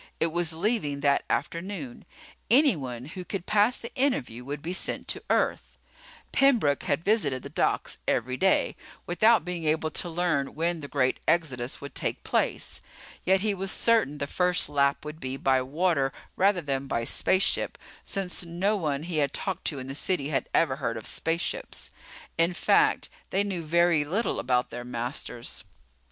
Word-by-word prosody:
It 165 - +2
was 170 0 +1
leaving 160 -5 -1
that 140 -1 +3
afternoon. 170 -7 -3 0.4
Anyone 155 - +3
who 180 +5 -7
could 185 0 -5
pass 210 +3 +3
the 235 - -8
interview 250 - 0
would 145 +2 -6
be 175 +3 -3
sent 185 - -2
to - - -2
Earth. - - 0 0.5
Pembroke 235 - +3
had 145 +3 0
visited 155 - +1
the - - -8
docks - - 0
every 125 +2 +1
day, 190 +7 +2 0.3
without 220 +6 +4
being 175 -2 -4
able 155 +1 +1
to 175 - -1
learn 160 -5 0
when 170 +2 0
the 145 - -6
great 130 -3 +1
exodus 135 -7 0
would 140 -1 -8
take - - -2
place. - - -1 0.4
Yet 190 +1 +4
he 210 0 +1
was 195 0 -2
certain 225 - +3
the 140 - -2
first 180 +3 +1
lap 140 0 +1
would 150 +1 -7
be 130 -1 -4
by 135 -1 +2
water 140 0 +1 0.2
rather 195 -1 +3
than 135 -1 -2
by 115 -3 -1
spaceship, 185 +10 +1 0.3
since 190 -2 -2
no 175 +5 0
one 150 -6 -1
he 170 -1 -3
had 140 -2 +1
talked 190 -3 -3
to 145 - 0
in 130 - -5
the 135 - -6
city 145 -1 -1
had 135 -4 -1
ever 135 -5 +2
heard 115 -5 -2
of 110 - -8
spaceships. 165 +1 -2 0.5
In 170 +2 +3
fact, - - +3 0.2
they 195 - +2
knew 190 -4 -3
very 170 -1 +3
little 190 +11 -1
about 125 -1 +1
their 120 0 -5
masters. 120 0 -5
160 Hz, 170 wpm, -27 LUFS, 140-185 Hz, 0.5 s, without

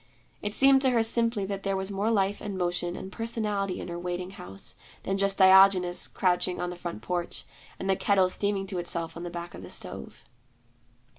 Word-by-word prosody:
It 205 +1 -3
seemed 270 0 +6
to 265 - +3
her 235 -3 +3
simply 230 -2 +1
that 195 0 -4
there 195 -1 -1
was 190 +1 -4
more 200 +3 0
life 200 -2 +1
and 200 -2 -4
motion 175 -1 -1
and 190 - -7
personality 210 -4 -2
in - - -6
her 170 0 -5
waiting 180 +1 -4
house, 95 - -9 0.3
than 195 0 -1
just 200 0 +2
Diogenes 190 -2 +6
crouching 180 -1 0
on 180 - -2
the - - -6
front 175 -11 -6
porch, 175 -1 -3 0.3
and 190 - -5
the 190 - +3
kettle 190 -1 +3
steaming 200 +1 -1
to 190 -2 -4
itself 170 -1 -3
on 165 - -7
the 175 - -4
back 175 0 -6
of - - -9
the - - -9
stove. - - -8
190 Hz, 205 wpm, -28 LUFS, 180-205 Hz, 0.3 s, seemed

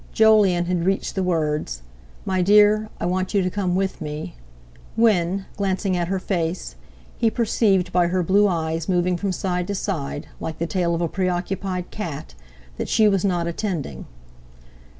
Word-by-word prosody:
Jolyon 210 -5 +5
had 175 -1 -1
reached 195 0 0
the 190 - -1
words: 150 - -1 0.4
"My 190 -1 0
dear, 210 +2 +5
I - - -2
want 185 +3 -1
you 195 - +3
to 185 - 0
come 185 -3 -1
with 190 -1 -1
me," 150 - -5 0.6
when, 195 -4 +2
glancing 195 -1 0
at 175 -1 -1
her 190 +2 -1
face, 175 - -2 0.5
he 230 - +3
perceived 205 -5 +1
by 175 -1 +3
her 180 +1 0
blue 200 +4 +4
eyes 165 -2 -2
moving 180 0 +2
from 195 +2 -2
side 180 -1 -2
to 200 - -2
side—like 160 -3 -4
the 170 - -1
tail 170 -1 0
of 165 - -2
a 170 - +1
preoccupied 185 0 -2
cat—that 60 - -8
she 220 -2 +4
was 195 -3 +2
not 175 -4 +1
attending. 170 - -4
180 Hz, 160 wpm, -23 LUFS, 170-195 Hz, 0.6 s, Jolyon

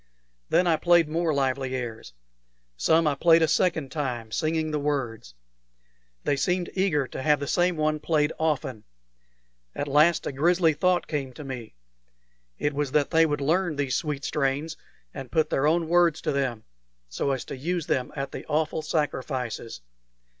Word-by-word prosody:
Then 180 - +3
I 165 -2 +3
played 170 0 +4
more 165 +1 0
lively 135 -2 -1
airs. 115 - -6 0.6
Some 160 - +3
I 150 - +3
played 165 +3 +4
a - - +4
second 160 -5 +1
time, 125 -7 -3
singing 155 +4 -1
the 150 - -1
words. 125 - -3 0.9
They 145 - +1
seemed 175 +5 -1
eager 180 -8 +1
to - - -6
have 150 +1 +3
the 140 - -3
same 175 +3 +1
one 155 0 0
played 150 -1 +1
often. 145 -7 -1 0.9
At 145 - -3
last 150 +4 +4
a - - -2
grisly 165 +4 +3
thought 180 +3 +1
came 140 -4 -4
to 150 - -9
me: 125 - -7 0.8
it 145 - -1
was 145 -1 -2
that 150 -2 +2
they 165 -1 +5
would 145 -2 -2
learn 165 +3 +1
these 140 -2 -1
sweet 150 -2 -2
strains, 150 +2 -1 0.4
and 135 -3 -8
put 160 -2 +1
their 140 +2 +2
own 165 +1 +2
words 170 -1 +3
to - - -1
them 130 -6 -2 0.4
so - - -2
as 135 -2 -2
to - - -6
use 165 +4 -2
them 125 -1 -1
at 135 -1 -4
the - - -7
awful 155 +1 0
sacrifices. 130 - -3
150 Hz, 170 wpm, -26 LUFS, 135-160 Hz, 0.9 s, they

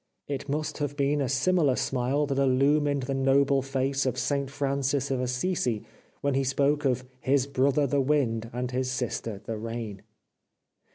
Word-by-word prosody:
It 140 0 -4
must 150 +3 -2
have 145 -1 -3
been 140 +1 +1
a 135 - 0
similar 145 +1 +2
smile 130 +4 0
that 140 -1 -1
illumined 140 +1 +3
the 135 +2 -2
noble 135 +1 +3
face 135 0 -1
of 125 - -1
St 140 -2 -1
Francis 140 0 -1
of 130 -1 0
Assisi 125 - -1 0.4
when 140 -1 +1
he 135 +1 +1
spoke 140 +2 +1
of 130 -1 +1
" 130 - -33
his 135 0 +2
brother 140 +1 +2
the 140 +1 +1
wind 125 -6 +1
and 125 +1 -3
his 130 0 -1
sister 115 -5 -3
the 110 -1 -4
rain." 115 -3 -5
135 Hz, 170 wpm, -27 LUFS, 125-140 Hz, 0.4 s, illumined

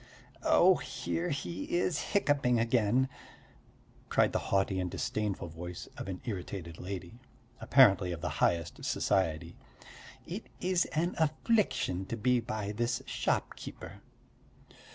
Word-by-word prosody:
"Oh, - - +5
here 85 -1 -3
he 95 - -2
is 175 -3 +1 0.2
hiccupping 140 -10 +3
again!" 120 +2 +2 1.0
cried - - +3
the - - +2
haughty 95 -1 +2
and 90 -1 -1
disdainful 105 -1 -2
voice 85 +2 -7
of - - -6
an 95 -2 -5
irritated 90 -5 -5
lady, 95 +3 -6 0.4
apparently 100 -9 +5
of 85 -2 -5
the 90 - -1
highest 85 -2 +1
society. 85 -2 0 0.7
"It - - -6
is 180 -1 +2
an 170 +4 -1
affliction 155 - +1
to 115 - -3
be 125 +2 +3
by 110 -3 -3
this 120 +2 -1
shopkeeper!" - - -3
100 Hz, 120 wpm, -31 LUFS, 90-125 Hz, 1.0 s, Oh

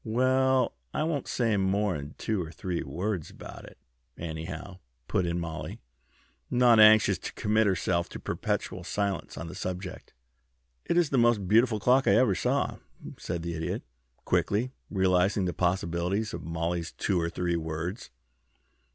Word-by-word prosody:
"Well, 130 +3 +2 0.2
I - - +1
won't 155 -3 -2
say 115 -4 +1
mor'n 95 -6 0
two 110 -4 -1
or 80 -2 -6
three 85 +2 -3
words 95 -2 -3
about - - -10
it, - - -14 0.4
anyhow," 80 +3 -6 0.3
put 90 - 0
in 85 +1 -1
Mollie, 80 -2 -5 0.7
not 120 -2 +5
anxious 110 0 +7
to - - -6
commit 110 +1 +2
herself 85 -2 0
to - - -8
perpetual - - -3
silence 100 -1 -2
on - - -5
the 85 - -8
subject. 90 0 -6 0.7
"It 170 - +1
is 170 -4 +3
the 135 - +3
most 115 -5 +3
beautiful 110 +2 +4
clock 130 +5 +3
I - - +6
ever 115 -4 +4
saw," 90 - 0 0.4
said 85 -1 -4
the 85 0 -3
Idiot, 80 0 -3 0.4
quickly, 115 +6 +1 0.2
realizing 95 0 +2
the 90 - -1
possibilities 90 +3 0
of - - -5
Mollie's 85 +1 -3
two 95 -4 0
or 85 - -1
three 85 0 -1
words. 80 - -4
95 Hz, 150 wpm, -28 LUFS, 85-110 Hz, 0.7 s, anxious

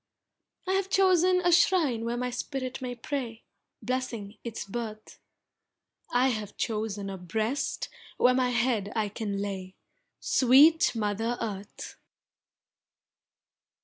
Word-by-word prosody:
I - - +1
have 385 0 0
chosen 370 -1 +4
a 355 0 +3
shrine 330 -9 +3
where 235 +1 -2
my 250 0 -2
spirit 255 +1 -4
may 250 -1 -4
pray, 240 -2 -5 0.4
Blessing 230 -4 -3
its 230 -2 -5
birth. 215 0 -7 0.9
I 250 +2 +3
have 215 -4 -4
chosen 215 -3 -2
a 195 -1 -6
breast 220 +9 -2 0.3
where 250 - +5
my 255 -1 +2
head 240 -4 0
I 215 -2 0
can 205 -1 -4
lay, 190 -2 -5 0.4
Sweet 295 +5 +5
Mother 225 +2 -1
Earth! 205 -3 -6
235 Hz, 115 wpm, -28 LUFS, 210-260 Hz, 0.9 s, where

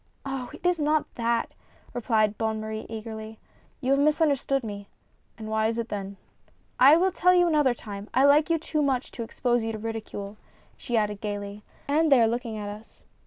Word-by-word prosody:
" - - -41
Oh! 270 -3 -4
it - - -12
is 355 -2 +2
not 300 0 +2
that," 235 0 0 0.4
replied 220 -3 +1
Bonne 220 0 -1
Marie 220 0 -5
eagerly; 220 0 -7 0.2
" - - -35
you 260 0 0
have 275 - +4
misunderstood 285 -3 +2
me." 205 -2 -6 0.3
" - - -40
And 220 -2 -7
why 220 0 +1
is 230 +1 -2
it 235 -1 -3
then? 200 -1 -5 0.2
" - - -36
" - - -39
I 310 - +8
will 375 +2 +2
tell 360 0 +4
you 355 -1 +5
another 295 -6 +3
time 205 -2 -8
— - - -40
I 260 - +5
like 290 +3 +5
you 335 - +3
too 305 -1 -2
much 270 -3 0
to - - -7
expose 240 +1 0
you 225 - -2
to - - -4
ridicule," 215 -2 -6 0.4
she 240 -3 -2
added 210 -2 -1
gayly 205 0 -5
— - - -30
"and 305 +2 +2
they 270 - +7
are 230 - +5
looking 230 -1 -3
at 205 -1 -5
us." 210 +2 -10
230 Hz, 225 wpm, -26 LUFS, 215-285 Hz, 0.4 s, I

